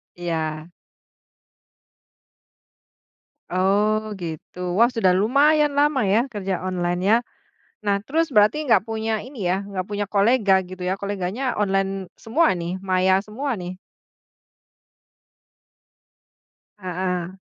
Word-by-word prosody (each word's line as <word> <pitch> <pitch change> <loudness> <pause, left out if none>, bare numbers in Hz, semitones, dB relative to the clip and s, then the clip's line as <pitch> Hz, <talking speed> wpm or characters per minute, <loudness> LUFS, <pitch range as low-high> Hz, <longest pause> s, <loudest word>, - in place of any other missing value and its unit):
Iya. 160 -2 -3 2.8
Oh, 210 +3 +1
gitu. 175 +2 -5
Wah, 235 +2 +6
sudah 225 -6 +3
lumayan 290 +7 +3
lama 285 -4 +2
ya 225 +7 +2
kerja 195 -5 -3
online-nya. 185 +5 +1 0.6
Nah, 200 -1 +2
terus 325 +7 0
berarti 215 +9 +4
nggak 225 -6 +4
punya 220 -1 -2
ini 250 -8 -5
ya, 190 +3 0
nggak 185 -2 -4
punya 205 0 -2
kolega 205 -1 +4
gitu 185 0 -8
ya, 180 +1 0
koleganya 205 +6 -2
online 195 -2 -1
semua 310 +9 +2
nih, 170 +2 -3
maya 185 +1 +3
semua 245 +5 -3
nih? 180 0 -7 3.0
Heeh. 185 -1 -3
200 Hz, 105 wpm, -23 LUFS, 185-225 Hz, 3.0 s, Wah